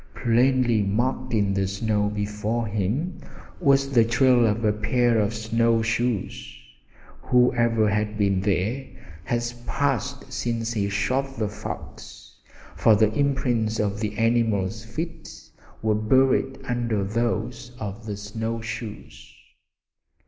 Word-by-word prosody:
Plainly 120 -1 +3
marked 120 +6 -1
in 100 -3 +1
the 95 0 0
snow 105 +1 0
before 105 +2 -2
him 110 - -2 0.4
was 140 -4 +3
the 120 -4 +5
trail 120 +1 +4
of 110 +2 0
a 105 - +3
pair 120 +2 +2
of 105 0 +1
snow 115 +1 +1
shoes! 115 -2 -2 0.6
Whoever 120 -3 +3
had 105 +1 -1
been 100 -2 +2
there 105 +7 -1 0.4
had 120 0 0 0.2
passed 140 0 -2
since 115 -1 -2
he 100 -2 0
shot 130 +7 -1
the 110 -2 -1
fox, 100 - -9 0.4
for 105 +5 +5
the 110 +1 +3
imprints 120 -6 0
of 105 -1 -1
the 105 -1 -3
animal's 110 -3 +1
feet 160 +8 -6 0.5
were 110 -1 +2
buried 130 +4 +2
under 120 -4 -1
those 115 +3 -2
of 105 +1 -6
the 105 -1 -4
snow 110 +3 -4
shoes. 110 -1 -8
115 Hz, 125 wpm, -24 LUFS, 105-125 Hz, 0.6 s, the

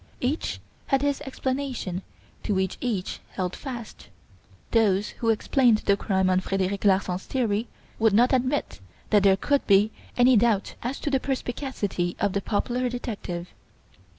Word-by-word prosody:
Each 270 +6 -1 0.3
had 270 -1 +2
his 285 -1 0
explanation 260 -9 -3 0.4
to 205 - -1
which 190 -1 -1
each 215 -7 -2
held 180 -1 -2
fast. 240 -5 -8 0.6
Those 210 -3 +3
who 230 - -2
explained 225 0 +3
the 200 - +4
crime 190 -2 +1
on 185 0 +3
Frederic 195 +1 -1
Larsan's 190 -2 +2
theory 230 -3 0 0.3
would 225 -1 +4
not 240 +6 +4
admit 260 - 0 0.3
that 210 -2 +6
there 195 -1 +5
could 285 +7 0
be 200 +2 +5 0.3
any 250 +1 +6
doubt 215 -3 +2
as 250 +4 -3
to 290 - -2
the 270 - +3
perspicacity 245 -9 -2
of 200 -2 +1
the 200 - 0
popular 245 +5 -1
detective. 200 -8 -5
220 Hz, 150 wpm, -26 LUFS, 195-255 Hz, 0.6 s, that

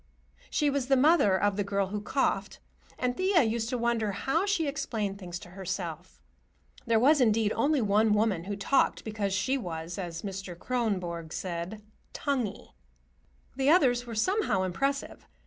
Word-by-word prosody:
She 295 -2 +1
was 275 -2 -1
the 270 0 +4
mother 260 - +4
of 205 -1 +1
the 205 - +1
girl 200 -1 -1
who 205 +1 -3
coughed, 270 +6 -1 0.4
and 250 -1 -1
Thea 370 -2 +3
used 225 0 -1
to 250 - -1
wonder 230 -3 0
how 325 - 0
she 365 -6 +1
explained 215 -8 -3
things 175 -3 -6
to 175 0 -12
herself. 180 -2 -5 0.7
There 230 -1 +4
was, 285 +4 +5
indeed, 220 -2 +3
only 280 +4 +2
one 210 0 +3
woman 205 -5 +1
who 205 +1 -3
talked 235 +7 +1
because 210 -2 -2
she 205 +8 0
was, 170 -3 -5
as 170 -3 -5
Mr. 195 -3 -6
Kronborg 185 -9 -2
said, 185 +5 -5 0.3
"tonguey." 250 -8 -3 0.8
The 270 +1 +2
others 250 -7 +4
were 230 - -6
somehow 220 - +1
impressive. 275 +10 -2
215 Hz, 160 wpm, -29 LUFS, 190-265 Hz, 0.8 s, was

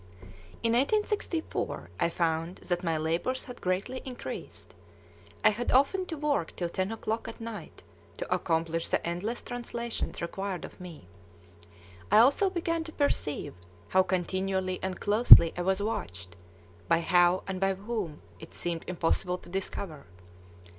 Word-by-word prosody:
In 230 0 +3
1864 345 - 0
I - - +2
found 165 +1 -1
that 175 0 -1
my 165 -2 0
labors 165 +12 -1
had 250 - -10
greatly 195 +8 -1
increased; 255 -2 -8 0.7
I - - +8
had 235 +4 -2
often 325 +9 +3
to 320 - -4
work 285 - -1
till 175 -1 -2
ten 185 +4 -2
o'clock 225 0 -3
at - - -8
night 230 -1 -8 0.3
to - - -2
accomplish 165 0 0
the - - 0
endless 195 +8 -3
translations 235 -1 -4
required 190 +2 -4
of - - -13
me. 170 - -10 1.0
I 210 - +7
also 275 - +5
began 335 -2 -1
to 320 - -8
perceive 285 - -1 0.4
how 190 - +5
continually 185 0 -1
and 190 -1 -3
closely 205 -6 +8
I 180 - -2
was 190 +2 +1
watched, 90 - -4 0.5
but 165 0 +3
how 175 +1 +4
and 190 -1 -4
by 195 0 +2
whom 200 -6 -5 0.2
it 160 - -12
seemed 170 -1 -3
impossible 180 +1 0
to - - -15
discover. 180 -4 -4
190 Hz, 145 wpm, -29 LUFS, 170-235 Hz, 1.0 s, I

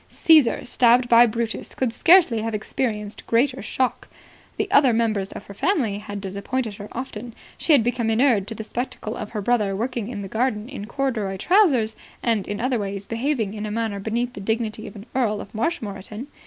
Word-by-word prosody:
Caesar, 310 -7 +4
stabbed 245 0 +4
by 240 0 +7
Brutus, 230 0 -4
could 250 -3 -1
scarcely 325 -8 +5
have 225 0 -2
experienced 210 -1 -3
a - - -26
greater 255 +3 +1
shock. 255 +4 -2 0.5
The - - 0
other 275 -4 +5
members 215 -4 0
of - - -9
her 200 - -10
family 255 - 0
had 205 -1 -6
disappointed 200 +4 -3
her 205 -1 -8
often. 240 -2 -6 0.2
She 320 - +2
had 270 -6 +6
become 235 -1 0
inured 225 -3 +3
to 225 - -6
the 220 - -6
spectacle 235 -1 -4
of 210 - -6
her 210 -3 -4
brother 210 -4 +1
working 235 0 -3
in 215 -4 -5
the - - -5
garden 220 0 -1
in 260 -7 -7
corduroy 225 -6 -2
trousers 270 - +3 0.3
and 225 -5 0
in 205 - -4
other 250 0 0
ways 200 -1 -4
behaving 230 -3 -1
in 215 0 -4
a - - -4
manner 220 -2 -2
beneath 235 +4 -2
the 200 - -8
dignity 220 +1 -2
of 200 - -11
an 205 0 -10
Earl 225 -5 +1
of 200 - -9
Marshmoreton. 215 - -3
225 Hz, 195 wpm, -23 LUFS, 210-250 Hz, 0.5 s, by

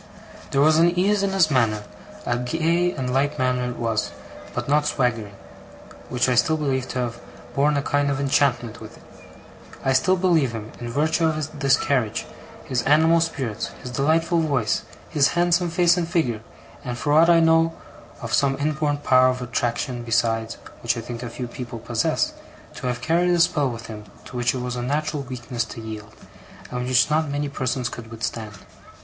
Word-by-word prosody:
There 135 - +2
was 155 +2 +5
an 175 +1 +3
ease 200 +2 +3
in 200 - +1
his 190 -5 +3
manner 110 -5 +2 0.4
a 120 - +1
gay 165 +7 +1
and 130 -6 -3
light 145 +3 +1
manner 125 -2 0
it 125 - -6
was, 115 -2 -1 0.5
but - - -3
not 150 +1 +2
swaggering 115 -7 -1 0.7
which 125 0 +1
I 125 - +3
still 160 +6 +3
believe 135 -4 -1
to - - -5
have 120 -1 -4 0.3
borne 145 +1 +2
a 140 - 0
kind 145 0 +1
of 140 -1 -1
enchantment 125 -5 +1
with 110 - -11
it. - - -18 0.8
I 135 - +3
still 185 +8 +3
believe 170 -9 +2
him, 110 -1 -6
in 120 - -5
virtue 155 +5 +1
of 155 -1 -3
this 135 -1 +4
carriage, 115 -6 0 0.4
his 125 -2 -1
animal 160 +4 +4
spirits, 130 -10 -2 0.2
his 125 - -6
delightful 160 +6 +2
voice, 140 -9 +1 0.3
his 145 -4 +2
handsome 175 0 +2
face 175 +1 +4
and 170 -2 0
figure, 155 - 0 0.4
and, 125 -3 -4
for 145 +4 0
aught 165 +3 +6
I 170 -1 +6
know, 165 0 +3 0.5
of - - -4
some 135 -1 +2
inborn 150 0 0
power 130 -3 +4
of 130 0 0
attraction 120 0 -2
besides 115 -1 0 0.2
(which 120 0 0
I - - -3
think 120 0 -7
a 120 - -5
few 125 +1 -5
people 120 0 -7
possess), 115 0 0 0.4
to - - -4
have 125 -1 -2
carried 170 +6 +2
a 175 -1 +3
spell 165 -5 +3
with 115 -1 -7
him 105 -2 -8 0.2
to - - -11
which 120 +1 +1
it 125 - -3
was 125 0 -3
a 120 - -3
natural 145 +3 -1
weakness 125 -2 -4
to 115 - -9
yield, 110 -1 -8 0.6
and 125 0 -3
which 130 +3 +3
not 155 0 +2
many 145 0 -2
persons 130 -2 -2
could 115 -2 -8
withstand. 110 -1 -5
135 Hz, 190 wpm, -23 LUFS, 120-155 Hz, 0.8 s, aught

